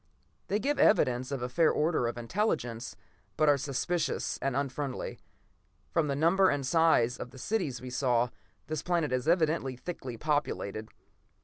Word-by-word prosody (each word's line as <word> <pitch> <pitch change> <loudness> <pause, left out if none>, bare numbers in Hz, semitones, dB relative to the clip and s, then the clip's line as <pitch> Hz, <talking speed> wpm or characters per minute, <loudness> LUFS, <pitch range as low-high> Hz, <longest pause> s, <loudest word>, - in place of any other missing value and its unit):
They 205 - +1
give 285 +6 -1
evidence 125 - +3
of 135 -3 -3
a - - -1
fair 160 +6 +3
order 155 -5 +1
of 120 - -4
intelligence, 120 - -2 0.4
but 155 0 +3
are 145 - +6
suspicious 145 +3 -1
and 135 -2 -1
unfriendly. 140 -1 -3 0.7
From 160 -2 +2
the 140 - 0
number 180 +6 +4
and 145 -2 -1
size 130 -5 +3
of 125 - -6
the 130 - -14
cities 150 - -2
we 130 0 -7
saw, 125 -2 +2 0.4
this 155 -1 -3
planet 170 -5 0
is 130 +3 -1
evidently 160 -6 +2
thickly 130 -4 -6
populated. 110 -7 -2
140 Hz, 155 wpm, -30 LUFS, 125-165 Hz, 0.7 s, are